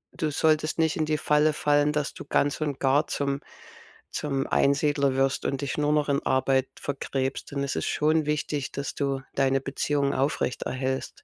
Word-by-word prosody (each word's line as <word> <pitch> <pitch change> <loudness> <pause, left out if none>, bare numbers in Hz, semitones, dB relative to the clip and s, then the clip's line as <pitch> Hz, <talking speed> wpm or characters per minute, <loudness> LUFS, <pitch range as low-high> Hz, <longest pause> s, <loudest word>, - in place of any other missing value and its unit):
du 160 -3 -1
solltest 155 +1 +1
nicht 160 -1 +2
in 155 - +1
die 155 0 0
Falle 150 +1 +3
fallen, 145 0 +2
dass 150 -1 -1
du - - -9
ganz 145 +1 +1
und 145 -3 -2
gar 140 +3 +3
zum 140 0 -2 0.7
zum 135 -2 -2
Einsiedler 140 -1 +2
wirst 135 0 +1
und 135 - -1
dich 140 - -3
nur 150 0 +2
noch 150 -1 +2
in 140 - +1
Arbeit 130 0 +2
verkrebst. 135 -1 -3
Denn 140 -1 -2
es 140 - -2
ist - - -2
schon 155 +1 +2
wichtig, 150 -2 -1
dass 140 0 -4
du 135 -2 -1
deine 135 0 +2
Beziehungen 140 +1 0
aufrecht 135 -2 -1
erhältst. 130 0 -3
140 Hz, 180 wpm, -26 LUFS, 135-150 Hz, 0.7 s, Falle